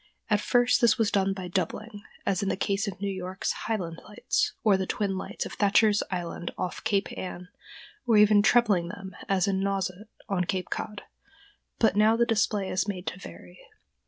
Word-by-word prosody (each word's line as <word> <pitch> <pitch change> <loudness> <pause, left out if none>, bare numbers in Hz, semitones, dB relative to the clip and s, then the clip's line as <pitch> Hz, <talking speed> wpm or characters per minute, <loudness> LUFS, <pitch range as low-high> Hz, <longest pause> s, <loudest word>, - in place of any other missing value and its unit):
At 210 -1 +3
first 245 +3 +3
this 235 -1 +5
was 225 -3 +1
done 195 -1 +2
by 190 -2 -5
doubling, 200 +4 -3 0.2
as 195 -2 +1
in 200 - -1
the - - -1
case 200 +1 0
of 190 -1 -5
New 200 - -2
York's 185 +1 -3
"Highland 180 -7 -4
Lights," 210 - 0
or 210 -3 +5
the 190 0 -2
twin 200 -2 -1
lights 190 - -4
of - - -7
Thatcher's 205 +1 +3
Island 175 -1 -4
off 180 -1 -4
Cape 200 -3 0
Ann, 180 -1 -7 0.6
or 225 -3 +5
even 210 0 +6
trebling 205 -6 +3
them 190 0 -8
as 195 -1 +2
at 200 - +1
Nauset, 195 +1 -2 0.2
on 180 -2 0
Cape 185 0 -3
Cod, 210 -1 -4 0.7
but 220 -4 +3
now 215 +2 +5
the 235 - +3
display 215 -3 0
is 190 - 0
made 185 -3 -4
to 185 - -4
vary. 90 - -12
195 Hz, 190 wpm, -27 LUFS, 185-210 Hz, 0.7 s, even